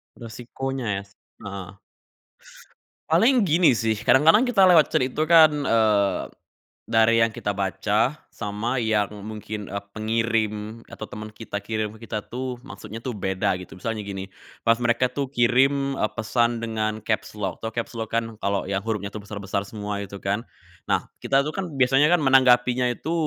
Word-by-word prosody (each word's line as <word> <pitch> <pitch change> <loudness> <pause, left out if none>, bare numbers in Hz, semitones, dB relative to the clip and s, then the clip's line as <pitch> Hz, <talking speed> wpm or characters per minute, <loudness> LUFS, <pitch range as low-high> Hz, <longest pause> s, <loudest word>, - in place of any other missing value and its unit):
Resikonya 125 +3 -6
ya, 100 - -3
s 100 - -24 0.3
heeh. 100 -2 -7 1.3
Paling 240 -1 +4
gini 170 0 +4
sih, 110 0 +1
kadang-kadang 165 - +5
kita 200 -6 +5
lewat 170 -5 +6
chat 125 - +2
itu 155 +5 -2
kan, 160 -2 +8
eee, 110 -6 +2 0.7
dari 115 0 +4
yang 115 - +4
kita 105 -1 -3
baca, 105 - 0 0.2
sama 115 +4 -2
yang 105 -3 +1
mungkin, 105 -1 -6
eee, 100 +1 -5
pengirim 110 0 -1
atau - - -8
teman 105 +1 -8
kita 105 -1 -6
kirim 110 0 -3
ke 115 - -11
kita 105 -1 -3
tuh, 125 +1 -4
maksudnya 110 -5 -9
tuh 130 - -2
beda, 95 -2 -1
gitu. 90 - -11
Misalnya 115 +3 -3
gini, 95 -1 -5 0.4
pas 115 +1 +3
mereka 120 +1 +2
tuh 140 0 -2
kirim, 135 +2 +2
eee, 105 - +1
pesan 115 +1 0
dengan 110 -1 -2
caps 110 -1 -2
lock, 100 -3 -4
tau 110 - -3
caps 115 +1 -4
lock, 115 -1 -4
kan? 115 0 0 0.2
Kalau 100 0 -1
yang 95 +1 -2
hurufnya 105 -2 -3
tuh 110 - -6
besar-besar 100 -1 -4
semua 105 -1 -4
itu 100 0 -8
kan. 100 +2 -1 0.5
Nah, - - +1 0.2
kita 135 0 +2
tuh 150 - -3
kan 190 0 -4
biasanya 135 +3 +4
kan 175 - +5
menanggapinya 125 -1 +4
itu, 145 +6 -4
115 Hz, 170 wpm, -24 LUFS, 105-130 Hz, 1.3 s, kan